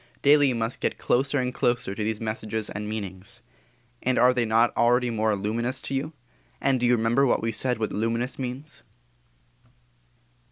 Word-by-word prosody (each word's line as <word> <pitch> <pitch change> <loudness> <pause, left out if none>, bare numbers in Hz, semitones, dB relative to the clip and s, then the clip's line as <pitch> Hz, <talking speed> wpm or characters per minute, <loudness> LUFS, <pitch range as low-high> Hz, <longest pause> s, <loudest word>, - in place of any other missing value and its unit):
Daily 145 0 +6
you 130 - 0
must 115 +1 -3
get - - -1
closer 135 +3 +1
and 125 -1 -1
closer 120 -6 0
to 105 - -4
these 110 0 -2
messages 110 -1 -3
and 105 +1 -5
meanings. 105 +2 -7 0.6
And 130 0 0
are 125 +1 +5
they 120 -2 0
not 115 +2 +2
already 120 +1 +3
more 110 -1 +1
luminous 115 +6 -2
to - - -5
you? 145 +4 -2 0.5
And 135 -1 +1
do 120 - +2
you 120 - +4
remember 120 +5 +2
what 120 - +1
we 115 - 0
said 125 +3 -1
luminous 115 +4 -2
means? 130 +3 -6
120 Hz, 170 wpm, -25 LUFS, 110-125 Hz, 0.6 s, Daily